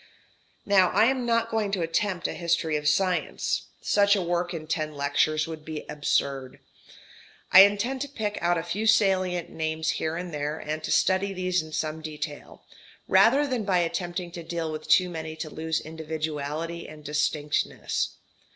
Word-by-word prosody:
Now 190 -3 +5
I - - +4
am 255 -1 +1
not 230 -1 +1
going 215 -3 0
to 185 -4 0
attempt 175 +3 -1
a - - -4
history 170 -2 0
of 150 0 -1
science. 180 +4 0
Such 200 0 +4
a 195 - 0
work 175 0 -1
in 160 -2 -5
ten 155 -1 -2
lectures 145 +2 +1
would 160 -2 -7
be 155 -1 -6
absurd. 140 -3 -1 0.9
I 190 - +11
intend 235 +6 -1
to 285 - -2
pick 215 -6 -3
out 175 0 +2
a 165 - -2
few 215 +5 -2
salient 190 -5 +2
names 160 0 -1
here 160 0 -1
and 175 -1 -6
there, 150 +1 -2
and 155 +1 -4
to - - -5
study 195 +1 +2
these 185 -1 0
in 155 0 -11
some 155 0 -3
detail, 150 -1 -7 0.4
rather 230 +10 +5
than 255 -5 -1
by 195 -3 +2
attempting 175 +1 -2
to 170 0 -7
deal 165 -1 -3
with 155 0 -6
too 185 - +5
many 160 -2 -6
to 160 -1 -6
lose 160 0 -2
individuality 160 +1 -4
and 155 0 -12
distinctness. 150 0 -1
170 Hz, 170 wpm, -26 LUFS, 155-190 Hz, 0.9 s, I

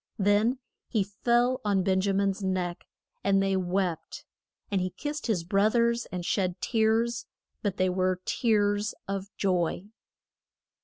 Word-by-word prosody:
Then 210 +5 +3 0.3
he 215 -4 +1
fell 240 +6 +1
on 200 -3 +2
Ben 190 0 +2
ja 200 +1 +1
min's 195 0 0
neck, 185 -2 -2 0.4
and 195 -1 +3
they 195 0 +1
wept; 185 -2 -2 0.5
and 195 -2 +1
he 185 - -1
kissed 295 +9 -5
his 200 -7 0
broth 200 +5 +2
ers 235 0 +2
and 180 -1 -5
shed 185 -2 0
tears, 225 +1 +1 0.3
but 205 -3 -2
they 185 - +2
were 185 0 +1
tears 205 -2 +1
of 195 0 -3
joy. 180 -2 0
200 Hz, 145 wpm, -28 LUFS, 185-220 Hz, 0.5 s, Then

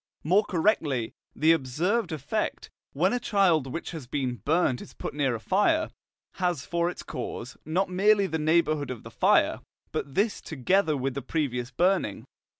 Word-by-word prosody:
More 185 +7 +4
correctly, 160 - 0 0.2
the 160 +2 +4
observed 165 - 0
effect, 155 - -3 0.2
when 180 - +1
a 245 - +1
child 185 - +2
which 165 - -5
has 155 -7 -7
been 130 -2 -2
burnt 145 - +1
is - - -12
put - - -5
near 135 -4 0
a - - -5
fire, 260 - +2 0.5
has 175 -7 -1
for 170 0 0
its 180 - -7
cause, 125 0 -6
not 180 +6 +1
merely 200 +2 +3
the 160 -4 -2
neighbourhood 155 -3 +2
of 125 -4 -6
the - - -10
fire, - - +3 0.3
but 135 - -4
this 205 +2 +1
together 160 +2 +1
with 135 0 -2
the 140 - -4
previous 125 -7 -2
burning. 180 - 0
160 Hz, 165 wpm, -27 LUFS, 135-190 Hz, 0.5 s, More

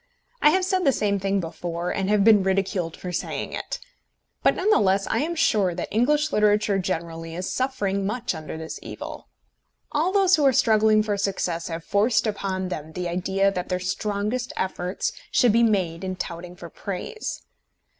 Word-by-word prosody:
I 300 - +7
have 370 +4 +2
said 375 -1 +1
the 280 - +5
same 205 -4 0
thing 195 +1 0
before, 170 +1 -4
and 195 0 -1
have 210 -1 +4
been 215 -1 +7
ridiculed 190 -3 -1
for 180 - -6
saying 175 - -3
it. - - -4 0.6
But - - +4
none 415 +4 +1
the - - +5
less 195 0 +2
am - - -2 0.2
I - - -7
sure 200 - +2
that 175 - -4
English 295 +7 +2
literature 210 -2 +3
generally 165 -2 -4
is 185 +2 -3
suffering 205 -7 -1
much 210 +3 -2
under 160 -1 -6
this 160 0 -6
evil. - - -8 0.6
All 315 +5 +1
those 380 -2 +4
who 300 - +1
are 270 -2 +5
struggling 215 -2 +4
for 210 -1 -1
success 180 -4 -1
have 165 -1 -5
forced 215 +5 +2
upon 195 -3 -2
them 160 -3 -6
the 180 +1 -3
idea 190 +3 +1
that 180 -2 -4
their 180 -1 0
strongest 205 +6 -2
efforts 185 - -2 0.2
should 245 -4 +4
be 230 - +4
made 190 -6 +1
in 185 0 -3
touting 175 0 -6
for 170 -1 -10
praise. 200 - -5
195 Hz, 185 wpm, -24 LUFS, 180-220 Hz, 0.6 s, I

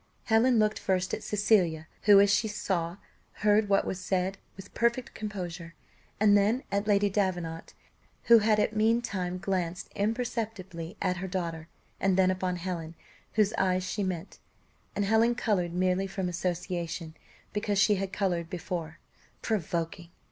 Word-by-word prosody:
Helen 230 +2 +4
looked 215 -1 +2
first 185 -1 0
at - - -2
Cecilia, 195 -8 +2 0.2
who, 205 -1 +8
as 200 0 +5
she 220 - +2
saw, 180 -4 -2 0.5
heard 210 0 +4
what 195 - +3
was 190 - -3
said 185 +1 -1 0.2
with 195 +1 -11
perfect 235 +1 0
composure; 180 -5 -6 0.4
and 205 -1 +5
then 210 +6 +2
at 200 +1 0
Lady 205 -1 +4
Davenant, 180 -5 -2 0.5
who 235 -1 +7
had 215 0 +2
meantime 215 -5 +1
glanced 180 -2 -3
imperceptibly 210 -5 -3
at 180 - 0
her 190 +2 -4
daughter, 170 -3 -4 0.3
and 190 -1 +2
then 185 -1 +4
upon 185 -1 -1
Helen, 170 -2 -5 0.4
whose 215 -1 +2
eyes 185 -1 +2
she 205 +3 -3
met 185 -2 -4 0.6
and 205 - 0
Helen 225 +3 +3
coloured 195 -8 0
merely 185 +1 +1
from 190 -1 -3
association, 175 -2 -3 0.4
because 210 -1 -1
she 210 +2 +5
had 190 0 -3
coloured 180 -5 -1
before 170 -3 -5 0.5
provoking! 170 -3 -2
190 Hz, 145 wpm, -29 LUFS, 180-210 Hz, 0.6 s, who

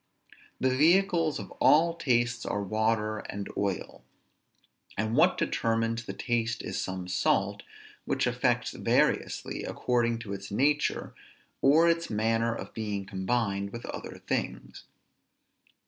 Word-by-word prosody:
The 130 0 +2
vehicles 165 +1 +3
of - - -8
all 165 +3 +5
tastes 120 -6 +1
are 100 - -2
water 110 +1 0
and 100 0 -6
oil. 100 -2 -3 0.9
And 110 +2 0
what 175 +6 +4
determines 115 0 0
the 100 - -5
taste 115 +1 -1
is - - -3
some 95 -1 -4
salt, 90 0 +1 0.4
which - - 0
affects - - +1
variously - - 0
according 120 -2 0
to 100 -4 -6
its 100 0 -7
nature, 145 +8 +1 0.5
or 155 +5 +5
its 170 0 +1
manner 115 +2 +1
of - - -8
being 105 -3 -3
combined 100 0 -1
with 120 +2 -7
other - - -7
things. - - -3
115 Hz, 125 wpm, -29 LUFS, 100-135 Hz, 0.9 s, all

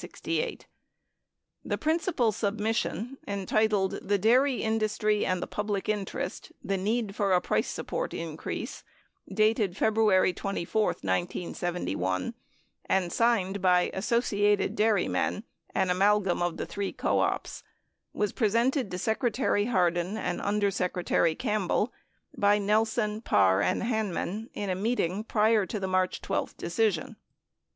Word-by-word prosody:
The - - -2
principal 315 -7 +1
submission, 220 +3 -2
entitled 200 0 +1
"The 205 +1 +1
Dairy 250 +6 +3
Industry 215 -1 +1
and 185 -1 0
the - - -2
Public 210 -2 -3
Interest: 210 -3 -3
The 195 - -1
Need 205 +2 -1
for 200 -3 +1
a 180 - +5
Price - - 0
Support - - -3
Increase," - - -5 0.5
dated 215 -3 +2
Febru 220 +1 +2
ary 185 -1 +4
24, 195 +2 -1
1971, 100 - -2 0.5
and 185 -3 +1
signed 200 -5 +1
by 180 -1 +3
Associated 205 -1 +1
Dairymen 210 0 +1 0.3
(an 185 - +2
amalgam 195 -1 +2
of 175 -1 -1
the - - -3
three 200 -1 -3
co - - 0
ops) - - -1 0.5
3 - - -11
was 210 -2 +1
presented 235 +2 +1
to 180 - -4
Secretary 220 0 0
Hardin 180 -2 +1
and - - -2
Under 200 0 +1
Secretary 180 -3 +1
Campbell 215 0 0 0.4
by 205 0 +4
Nelson, 215 +1 +1
Parr, 95 - +3
and - - 0
Hanman 220 -1 -2
in 200 -2 -2
a - - +1
meeting 205 -1 -1
prior 215 -2 +2
to 215 - -3
the 190 - -2
March 185 -1 0
12 - - -2
decision. 175 -1 -1
205 Hz, 130 wpm, -28 LUFS, 185-220 Hz, 0.5 s, a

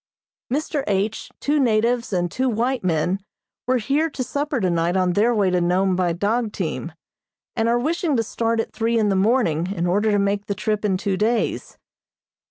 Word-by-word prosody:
Mr. 290 0 -1
H., 205 +2 -1
two 295 +1 +1
natives 235 -1 +1
and 175 -2 0
two 260 0 0
white 240 +2 -1
men, 180 +2 0 0.5
were 255 0 +3
here 280 +8 0
to 275 -3 -4
supper 285 +2 -2
tonight 175 -2 +1
on 185 -1 +2
their 215 +6 +3
way 205 -5 +2
to 180 -1 +2
Nome 185 +2 +2
by 180 -1 +1
dog 210 +6 0
team, 170 -3 -4 0.6
and 225 +1 +1
are 240 - +3
wishing 315 +3 0
to 225 - +1
start 230 +1 -1
at 225 - -3
three 230 +1 0
in 215 -2 +2
the 195 - +1
morning 190 -6 +2
in 175 -3 -2
order 205 +5 +2
to 205 - +3
make 200 0 0
the 200 - -2
trip 210 +1 -1
in 195 -3 +1
two 195 0 -1
days. 225 +3 -1
210 Hz, 190 wpm, -22 LUFS, 185-240 Hz, 0.6 s, were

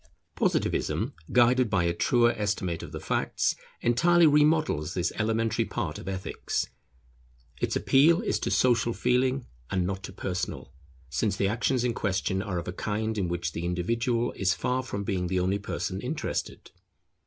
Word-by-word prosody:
Positivism, - - 0 0.2
guided 125 0 +4
by 95 -3 +2
a 85 0 +1
truer 120 +7 +3
estimate 100 -5 -2
of - - -8
the - - -5
facts, - - 0 0.3
entirely 170 +8 +4
remodels 150 - +3
this 90 -1 0
elementary 115 0 +1
part - - -4
of - - -10
Ethics. 95 -1 -2 1.0
Its - - 0
appeal 160 +6 +5
is - - 0
to - - -2
social 120 -2 +3
feeling, 130 +2 +1 0.2
and 95 -2 0
not 95 +1 -3
to - - -8
personal, 90 -6 -4 0.4
since 100 +5 0
the 100 - +1
actions 120 +4 +1
in 125 -1 +1
question 95 -2 -1
are 100 -3 -3
of 85 - -4
a 90 - -3
kind 110 +3 -2
in 100 -4 0
which 85 -1 -2
the 85 - -5
individual 115 +8 0
is 95 -2 0
far 125 +9 0
from 100 -6 -4
being 95 -3 -1
the 90 +1 0
only 95 +3 +1
person 100 - -3
interested. - - -4
105 Hz, 165 wpm, -27 LUFS, 90-125 Hz, 1.0 s, appeal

